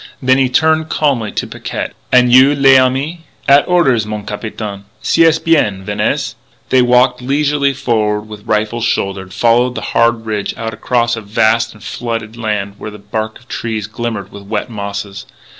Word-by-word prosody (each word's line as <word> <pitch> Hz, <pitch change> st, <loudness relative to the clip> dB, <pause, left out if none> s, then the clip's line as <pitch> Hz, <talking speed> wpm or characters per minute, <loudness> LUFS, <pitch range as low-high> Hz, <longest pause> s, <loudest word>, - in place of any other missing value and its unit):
Then 130 Hz, 0 st, +3 dB
he 130 Hz, -2 st, +2 dB
turned 160 Hz, +4 st, +2 dB
calmly 130 Hz, -8 st, 0 dB
to -, -, -2 dB
Picquet: -, -, -5 dB, 0.2 s
"An' 125 Hz, -1 st, +5 dB
you, 130 Hz, +3 st, +6 dB
l'ami?" 135 Hz, +4 st, +3 dB, 0.2 s
"At 140 Hz, +1 st, +5 dB
orders, 145 Hz, -11 st, +3 dB
mon 105 Hz, -1 st, -5 dB
capitaine." 105 Hz, -1 st, -6 dB, 0.2 s
"C'est 165 Hz, -1 st, +4 dB
bien. 105 Hz, -13 st, +2 dB
Venez." 110 Hz, +5 st, -1 dB, 0.4 s
They 130 Hz, -, +4 dB
walked 125 Hz, +1 st, +3 dB
leisurely 140 Hz, +1 st, +1 dB
forward 105 Hz, -4 st, 0 dB
with 105 Hz, -1 st, -11 dB
rifles 110 Hz, +2 st, 0 dB
shouldered, 95 Hz, -1 st, -2 dB
following 120 Hz, +5 st, +2 dB
the -, -, -4 dB
hard 115 Hz, -1 st, +2 dB
ridge 105 Hz, -2 st, -3 dB
out 115 Hz, 0 st, -4 dB
across 120 Hz, +1 st, 0 dB
a 115 Hz, -, -6 dB
vast 110 Hz, +2 st, +1 dB
and 105 Hz, -, -16 dB
flooded 115 Hz, -2 st, -4 dB
land 105 Hz, -3 st, -3 dB
where -, -, -6 dB
the 105 Hz, -, -10 dB
bark 110 Hz, +2 st, -4 dB
of 120 Hz, -, -23 dB
trees 110 Hz, -4 st, -3 dB
glimmered 110 Hz, -3 st, -5 dB
with 100 Hz, -, -10 dB
wet 105 Hz, +3 st, -4 dB
mosses. 100 Hz, -1 st, -6 dB
115 Hz, 165 wpm, -15 LUFS, 105-130 Hz, 0.4 s, you